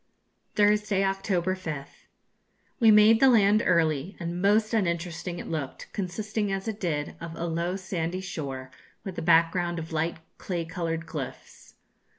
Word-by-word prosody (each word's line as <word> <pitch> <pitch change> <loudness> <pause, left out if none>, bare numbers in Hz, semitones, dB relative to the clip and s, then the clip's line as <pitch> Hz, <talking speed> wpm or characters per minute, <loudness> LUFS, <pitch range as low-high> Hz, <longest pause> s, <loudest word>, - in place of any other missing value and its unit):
Thursday, 210 -1 +3
October 195 -2 0
5th. 155 -7 -7 0.7
We 230 -3 +6
made 215 +1 +7
the 270 - +6
land 210 -3 +5
early, 165 -1 +1
and 170 0 -4
most 215 +3 +3
uninteresting 175 -3 -1
it - - -6
looked, 155 -5 -5
consisting, 205 +2 -2
as 195 +2 -3
it 220 -1 -3
did, 150 -6 -2
of 165 0 -6
a 170 - -3
low 170 +2 -1
sandy 185 -2 -3
shore, 135 -8 -6 0.3
with 190 -2 -6
a - - -4
background 170 +1 +3
of 165 0 -6
light 160 +2 -1 0.2
clay 175 -3 -3
coloured 165 -1 -3
cliffs. 150 -6 -8
175 Hz, 150 wpm, -27 LUFS, 165-200 Hz, 0.7 s, made